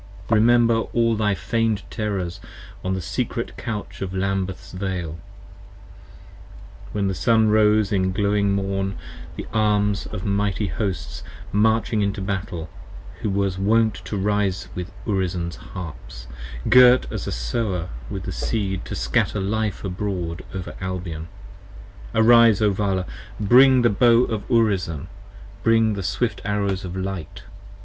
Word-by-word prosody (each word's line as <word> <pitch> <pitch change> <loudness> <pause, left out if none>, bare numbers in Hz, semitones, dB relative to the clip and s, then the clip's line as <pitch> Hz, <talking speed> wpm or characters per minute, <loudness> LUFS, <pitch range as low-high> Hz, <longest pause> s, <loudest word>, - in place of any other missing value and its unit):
Remember 115 +1 +5 0.2
all 115 -1 +3
thy 105 -2 +1
feigned 115 -1 0
terrors 100 -6 -3 0.4
on 95 0 -1
the 95 - -3
secret 115 +5 -3
couch 110 -3 -6
of 95 -1 -4
Lambeth's 95 -1 -2
Vale, 90 -4 -4 1.7
When 100 -2 0
the 95 - 0
sun 110 +2 +3
rose 105 -1 +4
in 95 -2 +1
glowing 100 +1 +1
morn, 95 0 -1 0.4
with - - -5
arms 105 -2 +1
of 100 -4 -6
mighty 100 +1 0
hosts 100 +2 -3 0.3
Marching 110 -1 +2
to 105 - -7
battle, 95 -4 -3 0.5
who 105 - -1
was 100 -1 0
wont 110 +2 +3
to 105 - -3
rise 95 -2 0
with 90 0 -5 0.2
Urizen's 90 -5 -1
harps - - -9 0.4
45 - - -3
Girt 125 0 +7
as - - -4
a - - -2
sower 90 - -2 0.2
with - - -5
his - - -5
seed 95 -4 -1
to - - -5
scatter 60 - 0
life 105 +1 -1
abroad 90 -3 -3
over 95 -2 -6
Albion: 90 -4 -4 0.9
Arise, 115 -1 +6
O 105 -2 +3
Vala: 95 -2 0 0.3
bring 125 +4 +6
the 120 - +4
bow 115 +4 +5
of 110 -4 -3
Urizen: 95 - +1 0.5
bring 115 0 +3
the 100 - -3
swift 110 +5 -1
arrows 100 -2 -1
of 90 0 -6
light. 95 -1 -5
100 Hz, 135 wpm, -23 LUFS, 95-110 Hz, 1.7 s, Girt